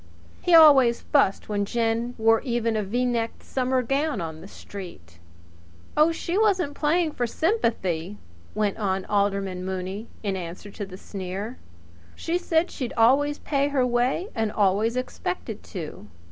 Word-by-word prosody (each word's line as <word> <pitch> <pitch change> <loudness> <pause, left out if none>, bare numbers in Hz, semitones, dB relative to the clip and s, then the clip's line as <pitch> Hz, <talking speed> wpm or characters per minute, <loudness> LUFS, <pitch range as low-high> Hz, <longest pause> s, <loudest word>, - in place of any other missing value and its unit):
He 350 - +4
always 275 -7 +7
fussed 235 -10 +2
when 205 -1 0
Jen 230 +2 -1
wore 225 0 +4
even 235 -3 -1
a 215 - +1
V 235 +6 -1
necked 230 -2 -2
summer 255 0 0
gown 275 0 0
on 160 -2 -5
the - - -10
street. 170 - -11 0.8
"Oh, 305 +2 +5
she 340 +3 -2
wasn't 375 -9 +2
playing 315 +3 +1
for 245 -4 -2
sympathy," 210 - -1 0.4
west 210 -1 0
on 190 -2 -1
Alderman 200 -2 0
Mooney 190 +3 -4 0.2
in 200 -2 -1
answer 180 +3 -7
to 205 0 -6
the 185 -1 -10
sneer. 195 +4 -6 0.6
"She 340 +2 -1
said 340 0 +1
she'd 250 -3 -4
always 280 +6 +4
paid 280 -1 0
her 270 -3 +2
way 250 - 0
and 220 -2 -1
always 210 +4 +2
expected 215 -4 -4
to. 160 - -7
225 Hz, 150 wpm, -25 LUFS, 195-275 Hz, 0.8 s, always